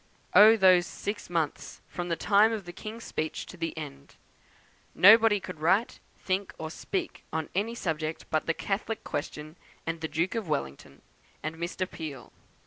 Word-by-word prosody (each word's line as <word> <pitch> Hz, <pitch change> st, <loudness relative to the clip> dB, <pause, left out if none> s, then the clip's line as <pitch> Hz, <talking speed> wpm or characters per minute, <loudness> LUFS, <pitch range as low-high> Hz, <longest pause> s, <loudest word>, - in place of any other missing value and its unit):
Oh, 220 Hz, +2 st, +9 dB
those 185 Hz, -3 st, +5 dB
six 205 Hz, -2 st, -5 dB
months, 165 Hz, -4 st, -2 dB
from 175 Hz, 0 st, -5 dB
the 170 Hz, -, +1 dB
time 205 Hz, +5 st, +4 dB
of 215 Hz, -4 st, -4 dB
the 175 Hz, -, -8 dB
King's 220 Hz, +5 st, -8 dB
speech 155 Hz, 0 st, -3 dB
to -, -, -11 dB
the 165 Hz, -2 st, -4 dB
end! 140 Hz, -2 st, -8 dB, 0.8 s
Nobody 220 Hz, +1 st, +7 dB
could 180 Hz, -4 st, -8 dB
write, 190 Hz, +9 st, +2 dB, 0.2 s
think, 190 Hz, +1 st, -2 dB
or 160 Hz, 0 st, -5 dB
speak 360 Hz, -, -4 dB
on 160 Hz, -1 st, -3 dB
any 215 Hz, +5 st, -1 dB
subject 160 Hz, -5 st, -3 dB
but 155 Hz, -, 0 dB
the 165 Hz, -, +1 dB
Catholic 210 Hz, +2 st, -3 dB
question, 155 Hz, +2 st, -5 dB, 0.3 s
and 165 Hz, 0 st, -3 dB
the 160 Hz, -, -1 dB
Duke 165 Hz, +4 st, -1 dB
of 220 Hz, -7 st, -3 dB
Wellington, 70 Hz, -, -4 dB, 0.4 s
and 155 Hz, +1 st, -3 dB
Mr. 175 Hz, +3 st, -3 dB
Peel. 150 Hz, -8 st, -8 dB
175 Hz, 165 wpm, -28 LUFS, 160-205 Hz, 0.8 s, Oh